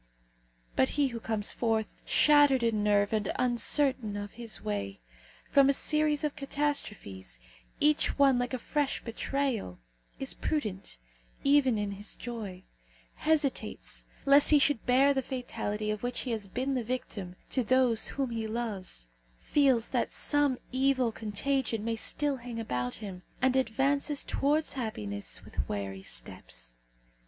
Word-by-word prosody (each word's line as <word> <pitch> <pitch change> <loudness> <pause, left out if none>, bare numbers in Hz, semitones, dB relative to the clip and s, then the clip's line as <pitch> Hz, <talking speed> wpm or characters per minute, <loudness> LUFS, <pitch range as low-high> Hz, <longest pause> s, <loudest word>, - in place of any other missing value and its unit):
But 260 - +3
he 285 -2 +3
who 235 -2 -5
comes 220 -2 +1
forth, 225 -2 -1
shattered 290 -4 +5
in 220 -3 +1
nerve 205 0 +3
and 210 -2 0
uncertain 250 -2 +2
of 205 0 -5
his 230 -2 -3
way, 100 -1 -3 0.5
from 275 -1 +6
a - - +5
series 305 +1 +1
of 300 -1 -1
catastrophes, 245 - -2 0.4
each 300 0 +2
one 275 -3 +5
like 245 +1 -1
a - - -2
fresh 290 +3 -1
betrayal, 240 - -2 0.4
is 270 - -1
prudent 210 - -3 0.5
even 275 -4 +4
in 205 -1 -2
his 200 +1 -5
joy; 210 -6 -6 0.5
hesitates, 305 -3 -1 0.2
lest 280 +1 +6
he 300 - +7
should 285 -4 +2
bear 270 +3 +5
the 265 - 0
fatality 225 -5 -3
of 210 -1 -4
which 245 0 -1
he 250 - -3
has 215 -3 -3
been 260 +7 -2
the 255 -2 -1
victim 210 -6 -4 0.2
to 255 - +1
those 250 -1 +3
whom 270 -3 -2
he 225 -1 -2
loves; 210 - -3 0.3
feels 265 -6 +3
that - - 0
some 290 -3 +1
evil 260 -2 +2
contagion 225 +1 -1
may 230 0 0
still 285 +5 -1
hang 240 -1 -7
about 125 - -2
him, 195 -4 -7 0.2
and 260 0 +2
advances 275 +4 +1
towards 300 +3 +1
happiness 105 - -4
with 65 - -4
wary 95 -2 -4
steps. - - -5
240 Hz, 145 wpm, -30 LUFS, 210-275 Hz, 0.5 s, he